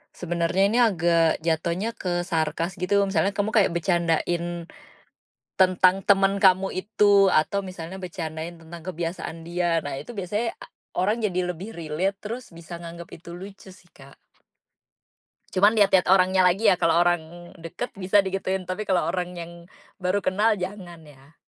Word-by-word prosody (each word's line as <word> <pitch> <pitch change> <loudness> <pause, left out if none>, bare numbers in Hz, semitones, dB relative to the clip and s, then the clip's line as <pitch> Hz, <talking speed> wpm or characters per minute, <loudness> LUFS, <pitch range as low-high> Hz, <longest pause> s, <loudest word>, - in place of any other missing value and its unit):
sebenarnya 175 +2 0
ini 240 - +2
agak 170 -8 +2
jatohnya 170 +6 -1
ke 175 -5 -3
sarkas 165 0 -2
gitu 200 +3 +2
misalnya 195 0 0
kamu 205 +1 -1
kayak 210 -5 +3
bercandain, 170 0 0 1.0
tentang 185 0 +4
temen 195 0 +3
kamu 190 -1 +4
itu 200 0 +3
atau 195 +6 +1
misalnya 185 0 -8
bercandain 170 -2 -6
tentang 165 +1 -10
kebiasaan 170 -1 -5
dia. 170 0 0
Nah, 145 -2 -5
itu 150 +13 -8
biasanya 210 +4 -2 0.4
orang 205 +5 +1
jadi 185 -4 -1
lebih 195 +7 -9
relate 170 +3 -2
terus 230 0 -7
bisa 170 +1 -9
nganggep 170 0 -9
itu 170 +1 -11
lucu 195 +2 -11
sih, 180 -2 -21
Kak. 135 0 -16 1.4
Cuman 205 +4 +4
lihat-lihat 195 -3 +4
orangnya 185 0 +4
lagi 200 +4 +4
ya, - - +1
kalau 165 0 +3
orang 175 0 -2
deket 165 +9 -6
bisa 195 +1 +3
digituin, 190 0 -2
tapi 185 +4 -4
kalau 185 -2 +2
orang 180 -1 -3
yang, 170 -1 -7 0.5
baru 185 +2 0
kenal 210 +3 +2
jangan 180 -3 -7
ya. 145 0 -19
180 Hz, 150 wpm, -24 LUFS, 170-195 Hz, 1.4 s, tentang